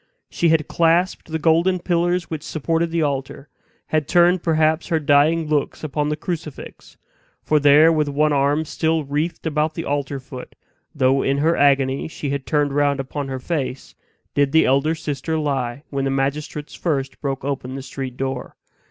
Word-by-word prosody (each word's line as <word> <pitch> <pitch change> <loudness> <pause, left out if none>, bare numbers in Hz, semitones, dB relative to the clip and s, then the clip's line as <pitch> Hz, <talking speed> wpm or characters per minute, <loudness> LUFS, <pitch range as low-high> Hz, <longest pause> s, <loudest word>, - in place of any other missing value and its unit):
She 170 - +1
had 160 -1 +2
clasped 170 +2 +1
the 160 - 0
golden 165 +4 +3
pillars 175 0 0
which 160 -2 -5
supported 165 +2 -1
the 165 -1 0
altar 140 0 -3 0.4
had 155 -2 0
turned 175 0 +4
perhaps 160 -1 +1
her 160 - +1
dying 150 +3 +3
looks 150 0 -1
upon 150 0 -1
the 150 - 0
crucifix; 160 -3 -7 0.5
for 155 - +2
there, 145 +3 +6
with 150 -2 +1
one 150 +1 +2
arm 145 +3 +1
still 160 +1 0
wreathed 150 +6 -3
about 155 0 0
the 165 - -4
altar 140 -1 -2
foot, 130 -1 -10 0.4
though 135 +1 +3
in 135 +1 +1
her 160 +4 +2
agony 140 -1 +2
she 145 -3 -5
had 140 -1 -4
turned 145 -2 +1
round 145 -1 +1
upon 135 +1 -4
her 135 -1 -4
face, 135 -3 -4 0.4
did 140 -1 +1
the 160 - +5
elder 140 +5 +2
sister 160 0 -3
lie 135 -3 -2
when 135 -1 -1
the - - 0
magistrates 145 +2 -2
first 140 -5 -3
broke 135 -2 -3
open 130 -2 -3
the 135 - -6
street 130 -1 -6
door. 135 -1 -4
150 Hz, 175 wpm, -21 LUFS, 140-160 Hz, 0.5 s, there